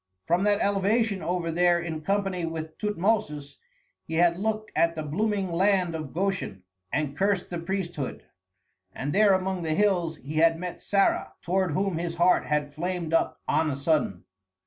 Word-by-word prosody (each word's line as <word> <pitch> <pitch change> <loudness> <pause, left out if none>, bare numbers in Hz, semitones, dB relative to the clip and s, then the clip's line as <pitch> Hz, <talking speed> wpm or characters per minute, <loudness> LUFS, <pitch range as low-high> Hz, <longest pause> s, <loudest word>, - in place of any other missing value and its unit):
From 175 - +2
that 205 0 +3
elevation 200 +1 +1
over 175 -1 -1
there 175 +1 +3
in 165 -2 -4
company 195 0 -1
with 160 -1 -4
Tutmosis 200 -8 -1 0.5
he 160 - -4
had 170 +1 +4
looked 215 +1 -2
at 165 0 +2
the 155 - -3
blooming 195 +4 -1
land 185 0 +2
of 155 -4 -5
Goshen 180 - -2 0.3
and 145 -2 -1
cursed 195 +2 0
the 175 - -3
priesthood. 175 -5 -4 0.7
And 145 +2 -3
there 205 -1 +5
among 190 -1 0
the 160 -2 -1
hills 175 -6 +1
he 150 +2 -6
had 165 +1 +4
met 180 +1 -6
Sarah, 195 -1 +1
toward 185 -2 0
whom 185 0 0
his 170 -1 -3
heart 175 +2 +3
had 150 -1 -1
flamed 170 0 -3
up 165 - +1
on 160 -1 +2
a 140 - -2
sudden. 140 - 0
175 Hz, 170 wpm, -27 LUFS, 160-195 Hz, 0.7 s, there